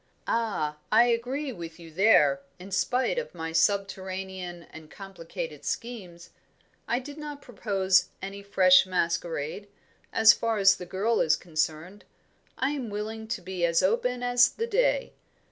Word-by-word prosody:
"Ah, 175 -10 -1
I 225 +2 +7
agree 250 +4 -1
with 170 -5 -9
you 165 -1 -12
there, 150 -7 +4 0.2
in 185 +2 -11
spite 255 - +1
of 480 - -8
my 165 -1 -5
subterranean 190 0 -2
and 160 -1 -12
complicated 195 - -8
schemes. 190 -8 -6 0.6
I 235 - +1
did 285 +4 -8
not 295 -1 -8
propose 195 -5 +1
any 195 +1 -7
fresh 190 -2 +5
masquerade, 170 0 -2 0.4
as 220 0 +7
far 230 -1 -1
as 195 -1 +5
the 180 - -8
girl 205 +6 0
is 155 - +3
concerned. 165 +3 -3 0.5
I 265 +2 0
am 270 -6 -4
willing 220 +2 -5
to 220 -3 -3
be 185 -1 -4
as 170 +1 +3
open 245 +5 0
as 245 +1 +4
the 460 - -4
day. - - +1
195 Hz, 145 wpm, -27 LUFS, 175-235 Hz, 0.6 s, I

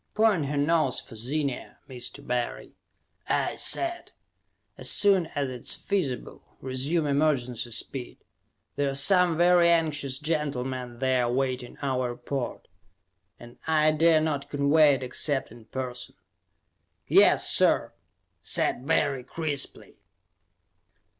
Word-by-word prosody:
"Point 210 -9 +2
her 145 +1 -3
nose 150 -2 +1
for - - -13
Zenia, 135 +4 -3
Mr. 125 -2 -8
Barry," 125 -1 -3 0.6
I - - 0
said. 345 0 -1 0.6
"As - - +1
soon 195 -5 +4
as 140 -2 -1
it 125 -2 -8
is - - 0
feasible, 170 -11 -3 0.2
resume 135 +5 -1
emergency 140 -5 0
speed. 120 +2 -3 0.6
There 145 -1 +1
are 135 - -4
some 175 +3 +3
very 175 0 +5
anxious 150 -5 0
gentlemen 130 -5 -3
there 130 -1 +1
awaiting 125 0 -2
our 130 -2 -1
report, 120 +1 -5 0.7
and 120 0 -14
I 155 -1 +3
dare 160 +1 +4
not 150 -3 -2
convey 145 +1 +4
it 130 - -6
except 135 +1 -1
in 115 -1 -14
person." 125 0 -6 0.9
"Yes, - - +5
sir!" - - +2 0.5
said 125 - -1
Barry 140 -5 +1
crisply. 150 -1 -4
140 Hz, 120 wpm, -26 LUFS, 125-155 Hz, 0.9 s, very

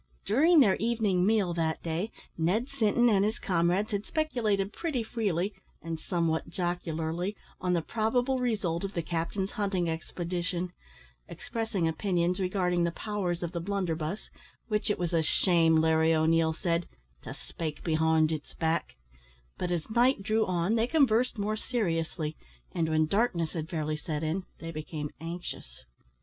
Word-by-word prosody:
During 310 - +5
their 200 -7 +5
evening 215 -5 +1
meal 205 -5 +2
that 160 -2 -1
day, 170 +6 -2 0.3
Ned 195 +11 +1
Sinton 240 -2 +3
and 200 -4 +4
his 215 +3 0
comrades 180 +2 +1
had 205 -1 -1
speculated 220 -11 0
pretty 295 -9 -2
freely, 205 -4 -1 0.3
and 165 -1 -4
somewhat 165 -3 -1
jocularly, 175 +1 -2 0.2
on 180 -1 0
the 170 -2 +1
probable 245 +6 +1
result 200 -9 0
of 195 +1 -3
the 170 - -1
captain's 170 +4 -2
hunting 195 -5 0
expedition 175 +2 -3 0.6
expressing 225 -7 -2
opinions 175 +1 0
regarding 180 -2 +1
the 170 - +2
powers 180 -3 -2
of 170 - -3
the 175 - -3
blunderbuss, 175 -2 -2 0.4
which 210 +1 0
it 210 - +1
was 175 -1 -2
a 165 - +4
shame, 165 0 +3
Larry 160 0 +4
O'Neil 160 +1 +3
said, 170 +1 -1 0.3
"to - - -7
spake 155 -3 -6
behind 160 -1 +3
its 155 -2 -5
back;" 165 0 -1 0.6
but 180 - -1
as 175 -3 -1
night 240 0 +3
drew 220 +2 +2
on, 180 +2 +1
they 230 +1 +2
conversed 255 -5 +3
more 210 +1 0
seriously, 165 - -2 0.4
and 160 -1 0
when 155 0 +3
darkness 175 -3 +1
had 160 -1 -4
fairly 155 -3 -2
set 150 0 -4
in 170 +4 -1
they 165 0 -6
became 150 -1 -5
anxious. 165 - -7
180 Hz, 155 wpm, -29 LUFS, 165-210 Hz, 0.6 s, During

